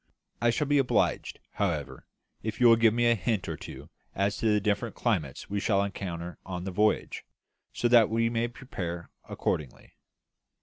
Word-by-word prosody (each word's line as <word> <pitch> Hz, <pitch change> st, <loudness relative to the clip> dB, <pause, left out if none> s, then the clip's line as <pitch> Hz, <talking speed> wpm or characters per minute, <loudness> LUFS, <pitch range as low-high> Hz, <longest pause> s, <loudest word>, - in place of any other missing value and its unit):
I 120 Hz, -, +4 dB
shall 120 Hz, +6 st, +1 dB
be 145 Hz, 0 st, +3 dB
obliged, 135 Hz, -, +1 dB
however, 75 Hz, -, -3 dB, 0.3 s
if 110 Hz, -1 st, -4 dB
you 125 Hz, -, +4 dB
will 115 Hz, -1 st, +9 dB
give 115 Hz, -1 st, +4 dB
me 120 Hz, +2 st, +1 dB
a 120 Hz, -, +5 dB
hint 105 Hz, -1 st, -1 dB
or 80 Hz, -, -3 dB
two 75 Hz, +2 st, -10 dB, 0.2 s
as 100 Hz, +1 st, +1 dB
to 110 Hz, 0 st, +1 dB
the 105 Hz, -, +3 dB
different 105 Hz, +2 st, -1 dB
climates 85 Hz, -, -1 dB
we 100 Hz, 0 st, -2 dB
shall 100 Hz, -1 st, +2 dB
encounter 90 Hz, -4 st, -5 dB
on 90 Hz, -2 st, -5 dB
the 95 Hz, -, -4 dB
voyage, 105 Hz, +3 st, +1 dB, 0.5 s
so 120 Hz, -, 0 dB
that 120 Hz, -2 st, +6 dB
we 115 Hz, +1 st, +2 dB
may 115 Hz, 0 st, 0 dB
prepare 90 Hz, -9 st, -6 dB, 0.2 s
accordingly." 70 Hz, -5 st, -3 dB
105 Hz, 175 wpm, -28 LUFS, 90-115 Hz, 0.5 s, will